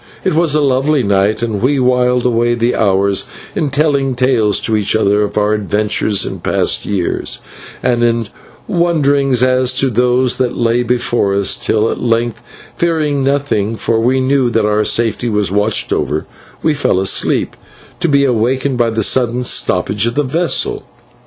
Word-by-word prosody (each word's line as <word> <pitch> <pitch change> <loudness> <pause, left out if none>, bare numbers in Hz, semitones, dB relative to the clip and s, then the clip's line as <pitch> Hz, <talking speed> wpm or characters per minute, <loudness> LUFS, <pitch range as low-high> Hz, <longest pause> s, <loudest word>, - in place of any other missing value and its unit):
It - - 0
was 160 -2 +1
a 150 - +2
lovely 135 +1 +1
night 100 +2 +1
and 110 -4 -2
we 135 +3 +1
whiled 125 -1 +1
away 120 0 +1
the 120 +1 0
hours 100 -1 +1 0.3
in 150 - -1
telling 140 -2 0
tales 120 -5 +1
to 110 - 0
each 105 -1 0
other 105 -1 +2
of 105 - -3
our 105 0 +2
adventures 105 0 0
in - - -6
past - - -1
years, 95 -4 -3 0.5
and 120 -2 +1
in 115 -1 +1 0.4
wonderings 140 -7 +1
as 130 0 +1
to 135 -1 +1
those 125 +2 +1
that 125 -2 -1
lay 120 +1 +1
before 120 -4 0
us, 100 -1 +1
till 110 0 0
at - - -5
length, 115 -1 -1 0.3
fearing 155 -5 0
nothing, 135 -6 0
for 115 0 -1
we 125 +3 +1
knew 130 -1 +1
that 115 -2 0
our 105 0 +1
safety 115 +2 0
was 105 -4 0
watched 105 +2 0
over, 75 +1 -2 0.4
we 155 - +2
fell 140 -9 0
asleep, 95 0 0 0.4
to - - 0
be 140 -1 +3
awakened 125 +2 0
by 120 -1 +2
the 110 -1 -1
sudden 125 +2 +1
stoppage 105 -3 0
of 120 - -3
the 145 - +1
vessel. 175 - 0
120 Hz, 170 wpm, -14 LUFS, 110-135 Hz, 0.5 s, be